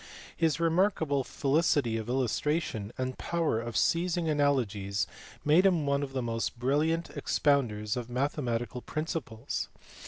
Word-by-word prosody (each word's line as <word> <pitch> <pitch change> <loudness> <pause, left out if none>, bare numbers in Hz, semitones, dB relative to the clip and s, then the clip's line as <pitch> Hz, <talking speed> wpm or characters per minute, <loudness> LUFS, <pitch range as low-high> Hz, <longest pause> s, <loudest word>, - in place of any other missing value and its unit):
His 165 -1 +1
remarkable 165 -4 +2
felicity 140 -4 +1
of 110 0 -3
illustration 130 -3 0
and 130 0 -3
power 165 -9 0
of 120 -1 -4
seizing 170 0 +1
analogies 115 -9 +1 0.4
made 155 +5 +6
him 175 -6 +3
one 140 0 +1
of 135 -2 -4
the 130 -2 -1
most 115 0 -2
brilliant 150 +7 +1
expounders 115 -7 +1
of 120 -1 -4
mathematical 125 -2 -1
principles. 155 -7 -4
140 Hz, 125 wpm, -30 LUFS, 120-160 Hz, 0.4 s, made